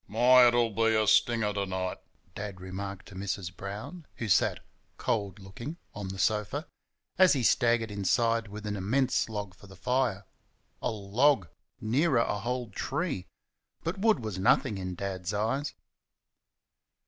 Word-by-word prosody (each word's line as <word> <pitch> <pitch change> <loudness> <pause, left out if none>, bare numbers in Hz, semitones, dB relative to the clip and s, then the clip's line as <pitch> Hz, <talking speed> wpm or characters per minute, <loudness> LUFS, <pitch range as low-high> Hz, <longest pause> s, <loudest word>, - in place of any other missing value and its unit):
"My! 125 +4 +6
it'll 120 -1 +3
be 115 +1 +2
a 110 0 +3
stinger 110 0 +3
to 100 -1 -2
night," 95 0 -3 0.3
Dad 100 -2 -6
remarked 95 +1 -6
to - - -12
Mrs. 95 -2 -4
Brown 110 - -7
who 110 - -4
sat, - - +3 0.4
cold 100 -3 -1
looking, 110 - -8 0.2
on 105 -2 -5
the 95 0 -6
sofa 105 - 0 0.5
as 185 -1 +7
he 135 -4 0
staggered 115 -1 +3
inside 115 +3 +1
with 105 +1 -8
an 105 -1 -2
immense 120 +7 +1
log 105 -3 -5
for 95 +3 -16
the 95 - -13
fire. 115 -1 0 0.6
A - - 0
log! 110 - +2 0.3
Nearer 135 +6 +2
a 110 -3 +1
whole 120 +1 -3
tree! 140 - -3 0.6
But 175 +4 -3
wood 215 - +3
was 105 -4 -4
nothing 105 +2 +3
in 90 -1 -4
Dad's 95 0 -4
eyes. 125 +8 -1
105 Hz, 150 wpm, -29 LUFS, 100-125 Hz, 0.6 s, as